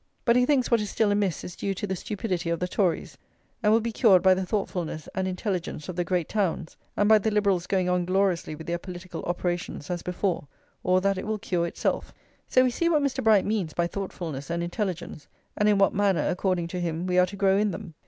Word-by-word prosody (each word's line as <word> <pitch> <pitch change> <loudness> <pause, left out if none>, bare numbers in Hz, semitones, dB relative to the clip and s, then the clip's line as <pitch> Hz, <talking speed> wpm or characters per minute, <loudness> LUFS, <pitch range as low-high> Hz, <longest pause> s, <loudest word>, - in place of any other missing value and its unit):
But 235 -2 +4
he 250 0 +4
thinks 270 -5 +2
what 235 -2 +4
is 210 - -3
still 215 0 +1
amiss 205 -4 0
is 180 - -7
due 195 -1 -2
to 205 - -3
the 190 -1 -2
stupidity 185 -3 -3
of 170 -1 0
the 180 - -1
Tories, 180 -3 -1 0.4
and 210 -2 +3
will 225 +1 +4
be 230 +1 -2
cured 200 -6 +5
by 190 -1 +7
the 190 +1 -1
thoughtfulness 175 -6 -3
and 190 0 -1
intelligence 180 -5 -3
of 180 - -4
the 175 - 0
great 175 -1 -1
towns, 185 -5 -1 0.2
and 205 - +3
by 215 0 +7
the 220 - 0
Liberals 200 -4 +1
going 185 -2 +1
on 180 -1 +1
gloriously 185 -4 +1
with 160 +1 -10
their 170 0 -2
political 180 0 -7
operations 175 -3 -3
as 175 -1 -2
before; 180 -4 -2 0.3
or 185 0 +2
that 195 0 +1
it - - -6
will 220 0 -1
cure 175 -4 -1
itself. - - -2 0.3
So 255 - +4
we 255 - +2
see 335 +7 +1
what 305 -4 +3
Mr. 280 -2 -1
Bright 215 -3 +5
means 200 -7 -1
by 170 - +1
thoughtfulness 170 -6 -5
and 170 0 -1
intelligence, 175 -4 -4 0.3
and 210 0 +3
in 205 - +4
what 195 0 +4
manner, 200 -2 +2
according 180 -2 0
to 180 - -4
him, 170 0 -2
we 180 0 +2
are 180 - +5
to 200 - -8
grow 195 -1 +3
in 210 +1 +2
them. 165 -2 -7
185 Hz, 235 wpm, -26 LUFS, 175-210 Hz, 0.4 s, by